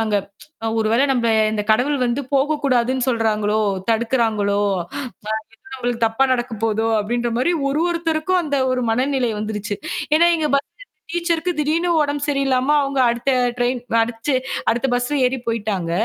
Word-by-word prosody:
நாங்க 215 -2 +1 0.6
ஒருவேளை 225 +5 +2
நம்ம 235 -2 +1 0.2
இந்த 210 -1 -1
கடவுள் 260 +6 +2
வந்து 240 +3 0
போகக் 295 +2 +1
கூடாதுன்னு 255 -1 +1
சொல்றாங்களோ, 215 -3 +1 0.3
தடுக்கறாங்களோ, 220 -3 +1 0.2
அ - - -13 0.8
எதோ - - -14
எங்களுக்குத் 240 -2 -2
தப்பா 225 +4 +1
நடக்கப் 240 -3 -4
போகுதோ 225 0 +1
அப்படின்ற 240 +3 -1
மாதிரி 300 +8 +2 0.2
ஒரு 285 +3 0
ஒருத்தருக்கும் 335 +1 0
அந்த 285 -2 -1
ஒரு 255 0 0
மனநிலை 255 +1 +1
வந்துருச்சு. 210 -1 -3 0.4
ஏன்னா 340 - +5
எங்க 315 -2 0
பஸ் 280 - 0 0.5
டீச்சர்க்கு 340 0 0
திடீர்னு 320 +4 +1
உடம்பு 290 0 -1
சரியில்லாம 275 0 +1
அவங்க 275 -1 -1
அடுத்த 240 +3 0 0.3
டிரைன் 245 +1 0 0.2
அடிச்சு 235 +4 -2 0.4
அடுத்த 240 +4 0
பஸ்ல 245 +4 -1
ஏறிப் 255 -1 -5
போயிட்டாங்க. 205 -7 -2
250 Hz, 145 wpm, -20 LUFS, 225-285 Hz, 0.8 s, ஏன்னா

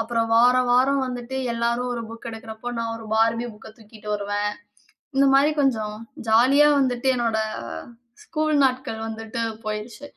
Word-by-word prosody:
அப்புறம் 230 0 -1
வார, 245 +2 +6 0.2
வாரம் 265 +2 +3
வந்துட்டு 250 +1 -5 0.2
எல்லாரும் 235 +1 -1
ஒரு 230 -1 -4
புக் 230 +1 -8
எடுக்கிறப்போ 225 +2 -7
நான் 225 0 -3
ஒரு 225 -1 -10
பார்பி 230 +2 +2
புக்க 215 - -13
தூக்கிட்டு 215 -1 -10
வருவேன். 205 0 -1 0.7
இந்த 275 0 +5
மாதிரி 290 +3 +5
கொஞ்சம் 215 -5 0 0.3
ஜாலியா 270 +7 +6
வந்துட்டு 255 0 +1
என்னுடைய 220 -2 0 0.7
ஸ்கூல் 310 -6 -1
நாட்கள் 255 -4 -2
வந்துட்டு 225 +1 -6 0.2
போயிருச்சு 215 +6 -5
235 Hz, 140 wpm, -23 LUFS, 220-255 Hz, 0.7 s, வார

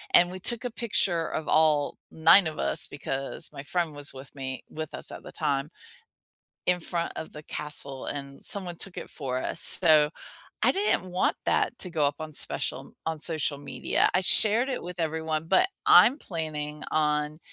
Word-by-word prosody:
and 175 0 +5
we 185 - -8
took 235 +5 +2
a 245 - -3
picture 195 -8 0
of 155 - -5
all 155 -2 +2
9 165 +3 +5
of 155 -1 -6
us, 155 - +1
because 135 -1 -4
my - - -8
friend 165 0 -2
was 145 -1 -2
with 135 0 -10
me 130 -1 -6
with 155 -1 -7
us - - -1
at - - -9
the - - -11
time, 140 +1 -2 1.0
in 180 0 +1
front 170 0 -3
of 160 - -7
the 150 - -10
castle, 140 -3 -2
and 140 -1 -6
someone 185 -4 +2
took 190 +1 -2
it - - -7
for 130 -4 -4
us, 145 - -1
so, 155 -4 +7 0.5
I - - +4
didn't 390 - 0
want 180 - 0
that - - 0
to 180 - +1
go 155 -4 +1
up 145 0 -2
on 155 0 -7
special - - +1
on 160 -1 -3
social 155 -2 0
media. 145 - -1
I 180 - +3
shared 220 +6 +4
it 255 - -4
with 175 0 -7
everyone, 160 0 -3
but 370 - +3 0.2
I'm 270 +5 +7
planning 150 - -6
on 150 0 0
155 Hz, 185 wpm, -26 LUFS, 150-180 Hz, 1.0 s, so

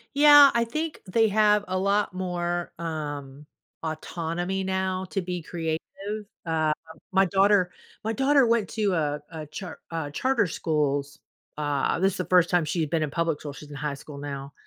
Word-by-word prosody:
Yeah. 290 -1 +9
I 235 - +3
think 310 +7 -4
they 225 +4 +3
have 210 0 +4
a 185 - -1
lot 200 +1 +1
more, 175 -1 -2
um, 145 -4 -5 0.4
autonomy 170 +4 -3
now 190 0 -1
to 195 - 0
be 180 -1 -4
creative. 160 -1 -3 0.6
Um, 160 -2 +1 0.4
my 190 +1 +4
daughter 195 -1 +3 0.3
my 220 - 0
daughter 270 +2 +4
went 230 -3 +2
to 210 -4 0
a 150 -3 0
a 160 -2 -7
char 160 +3 -8
uh, 160 -3 -3
charter 250 - +1
schools. 145 -3 -1 0.4
Uh, 145 0 0
this 190 +1 +2
is - - -6
the 180 - -2
first 180 -2 +4
time 175 -2 +3
she 160 +3 -2
had 155 -2 0
been 160 0 +1
in 150 - -3
public 165 -1 0
school- 145 - -5
she's 150 +1 -11
in 145 - -8
high 145 +1 -2
school 140 +1 -10
now. 140 -1 -6
175 Hz, 180 wpm, -26 LUFS, 150-195 Hz, 0.6 s, Yeah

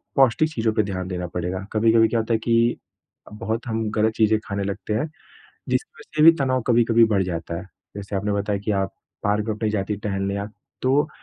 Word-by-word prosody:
पौष्टिक 135 +3 +4
चीज़ों 110 -3 0
पे 110 - +2
ध्यान 95 -2 -4
देना 90 -1 -4
पड़ेगा। 90 +2 -4
कभी-कभी 115 +1 +4
क्या 115 - 0
होता 115 +1 -1
है 110 - +2
कि 115 0 +2 0.5
अ, - - -14
बहुत 115 +3 -3
हम 110 -1 -1
गलत 110 +1 +1
चीज़ें 110 -1 +3
खाने 100 -1 -3
लगते 100 +2 -3
हैं, 110 +7 0 0.6
जिसकी 440 - 0
वज़ह - - -15
से 150 - +4
भी 165 - +10
तनाव 130 -2 +1
कभी-कभी 115 -1 +5
बढ़ 100 -2 +3
जाता 85 -2 -4
है। 90 - -8 0.3
जैसे 100 0 -5
आपने 100 +2 -1
बताया 100 0 -1
कि 110 - -1
आप 95 - -2 0.3
पार्क 105 +1 +1
में 110 - -1
भी 110 - +2
जाती 105 -1 -1
हैं 105 - -4
टहलने 100 -1 -1
आप, 100 +1 -5 0.3
तो 140 +4 +3
110 Hz, 220 wpm, -23 LUFS, 100-115 Hz, 0.6 s, भी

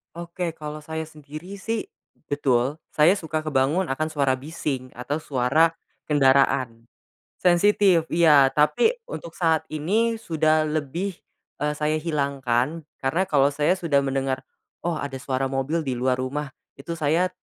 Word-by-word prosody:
Oke 170 0 -4
kalau 150 -1 -8
saya 160 0 -5
sendiri 155 +5 -10
sih, 225 +2 -3 0.4
betul 135 -2 +1 0.2
saya 160 +6 +5
suka 160 -4 -3
kebangun 155 +4 +1
akan 155 +4 -1
suara 140 -4 +1
bising 135 -2 -4
atau 145 +5 -4
suara 140 +5 +3 0.3
kendaraan. 135 -4 +2 0.5
Sensitif 180 -1 +3
iya 150 -5 +6
tapi 150 - +2
untuk 170 - -8
saat 160 -3 +2
ini 215 +10 0
sudah 155 -5 +1
lebih, 155 +6 -2 0.5
eee, 150 0 +1
saya 155 +1 0
hilangkan 140 -1 -1 0.2
karena 140 +7 0
kalau 140 -1 +3
saya 150 +6 +2
sudah 155 -6 +2
mendengar, 135 -1 -1 0.4
"Oh 170 -2 -1
ada 140 -2 -5
suara 135 -1 -1
mobil 135 +4 -1
di 130 - -1
luar 125 +1 0
rumah" 135 +3 -3 0.2
itu 165 +5 -7
saya, 165 +4 +2
150 Hz, 140 wpm, -24 LUFS, 135-165 Hz, 0.5 s, iya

